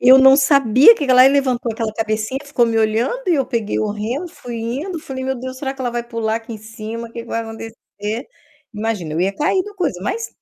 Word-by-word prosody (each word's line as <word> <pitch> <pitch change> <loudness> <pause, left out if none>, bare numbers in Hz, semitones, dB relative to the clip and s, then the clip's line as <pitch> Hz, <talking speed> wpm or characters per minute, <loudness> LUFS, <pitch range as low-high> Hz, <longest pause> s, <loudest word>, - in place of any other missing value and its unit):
Eu 255 +1 +8
não 265 0 +7
sabia 275 - +6
que 290 -10 -3
que 260 - +4
lá 255 +1 +8
ela 270 - +6
levantou 255 -4 0
aquela 220 -1 -3
cabecinha, 220 +3 -2
ficou 280 -4 +2
me 225 -1 0
olhando 230 - 0
e 345 - +4
eu 275 - +1
peguei 230 -5 -2
o 210 - -1
remo, 235 - -4
fui 240 -6 -8
indo, 275 +11 -4
falei: 260 -2 -6
"Meu 265 0 -1
Deus, 260 +1 -6
será 270 0 -3
que 270 - -13
ela 245 -2 -1
vai 240 0 -3
pular 230 -2 -2
aqui 230 0 -8
em 220 - -7
cima, 225 +1 -7
o 230 - -20
que 235 - -6
que 230 - -15
vai 230 - -2
acontecer?" 225 0 -7 0.5
Imagina, 210 -7 -3
eu 165 - -1
ia 195 +2 0
cair 370 +5 +1
do 415 0 -10
coisa, 340 - -2
mas 455 - -3
235 Hz, 250 wpm, -19 LUFS, 220-270 Hz, 0.5 s, Eu